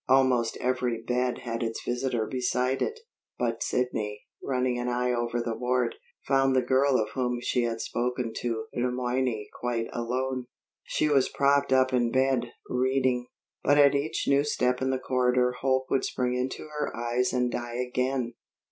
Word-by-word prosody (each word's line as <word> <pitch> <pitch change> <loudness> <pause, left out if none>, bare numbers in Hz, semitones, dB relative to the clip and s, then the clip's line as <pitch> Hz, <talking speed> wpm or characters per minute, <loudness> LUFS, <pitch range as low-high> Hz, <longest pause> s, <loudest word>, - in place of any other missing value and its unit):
Almost 130 -3 +3
every 125 -2 0
bed 125 +1 0
had 115 -1 -3
its 115 -1 -3
visitor 120 -2 -1
beside 125 +1 0
it; 450 0 -2 0.4
but - - -1
Sidney, 105 -4 -1 0.2
running 125 -2 0
an 120 0 -1
eye 125 0 +1
over 120 0 -1
the 115 -1 -2
ward, 125 +2 0 0.3
found 135 -1 +3
the 130 - +3
girl 130 +1 +3
of 105 -1 -1
whom 125 -2 -1
she 120 0 0
had 115 -1 -2
spoken 125 -1 -2
to 115 -2 -2
Le 125 +1 0
Moyne 125 -3 -1
quite 120 -2 -1
alone. 125 +2 -2 0.4
She 155 - +1
was 140 -3 +3
propped 140 0 +2
up 130 0 +4
in 120 -2 +3
bed, 130 -2 +1 0.2
reading; 130 -1 +1 0.4
but 145 +1 +4
at 145 -1 +7
each 140 +3 -1
new 140 0 +4
step 125 -3 0
in 130 - +1
the 130 - +1
corridor 125 -1 +2
hope 130 0 +2
would 135 - +2
spring 125 -1 -1
into 125 +1 -2 0.2
her - - -2
eyes 120 +1 0
and 125 -1 +1
die 120 0 -4
again. 125 0 -1
125 Hz, 170 wpm, -28 LUFS, 120-130 Hz, 0.4 s, at